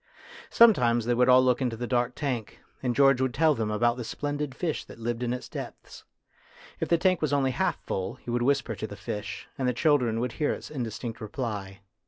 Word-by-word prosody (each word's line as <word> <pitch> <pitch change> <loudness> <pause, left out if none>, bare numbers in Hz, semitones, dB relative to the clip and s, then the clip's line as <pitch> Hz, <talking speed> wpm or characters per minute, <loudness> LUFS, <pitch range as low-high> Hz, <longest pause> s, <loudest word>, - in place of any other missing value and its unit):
Sometimes 125 - +5
they 120 - +2
would 125 +1 +3
all 130 0 +7
look 125 0 +2
into 120 -3 -1
the 120 - -3
dark 125 0 0
tank, 125 -7 -3 0.2
and 125 -2 -1
George 135 -2 +5
would 130 -2 0
tell 155 +1 +4
them 110 -5 -2
about 120 +3 +1
the 125 - -4
splendid 145 +2 -3
fish 165 0 -2
that - - -12
lived 115 +1 -3
in 120 -1 -1
its 125 0 -4
depths. - - -9 0.7
If - - -2
the 170 - +4
tank 185 +1 +2
was 155 -2 0
only 135 -2 +2
half - - 0
full, 95 0 -3
he 120 - -8
would 120 0 0
whisper 130 -2 +1
to 110 - -5
the 100 - -8
fish, 105 +1 -6
and 130 - 0
the 125 - +2
children 125 -5 +2
would 125 0 -1
hear 150 - 0
its - - -8
indistinct 120 -3 -5
reply. 105 -4 -5
125 Hz, 220 wpm, -27 LUFS, 115-140 Hz, 0.7 s, all